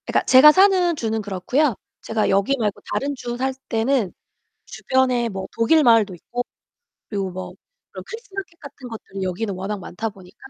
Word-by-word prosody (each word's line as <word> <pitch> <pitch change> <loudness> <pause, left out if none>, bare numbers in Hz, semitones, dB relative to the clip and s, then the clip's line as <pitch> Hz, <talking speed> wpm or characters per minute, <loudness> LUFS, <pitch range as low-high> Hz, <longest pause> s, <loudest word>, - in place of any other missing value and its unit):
그니까 - - +1
제가 265 +4 +9
사는 370 -1 +4
주는 225 -5 -2
그렇고요. 210 - 0 0.3
제가 225 -1 -1
여기 200 +8 +2
말고 210 -3 -1
다른 285 +1 -1
주 240 -2 -5
살 265 +1 -1 0.2
때는 225 -2 +1 0.6
주변에 255 -2 +1
뭐 190 -3 -5
독일 230 +8 +3
마을도 225 -6 +4
있고 240 +8 -5 0.6
그리고 195 -3 -3
뭐 180 0 -7 0.4
그런 185 - -8
크리스 450 -1 -9
마켓 385 -4 -7
같은 280 -3 -10
것들이 200 -4 -8
여기는 190 +3 -2
워낙 195 +3 -4
많다 205 +5 -4
보니까 195 -1 -15
230 Hz, 355 characters per minute, -22 LUFS, 195-275 Hz, 0.6 s, 제가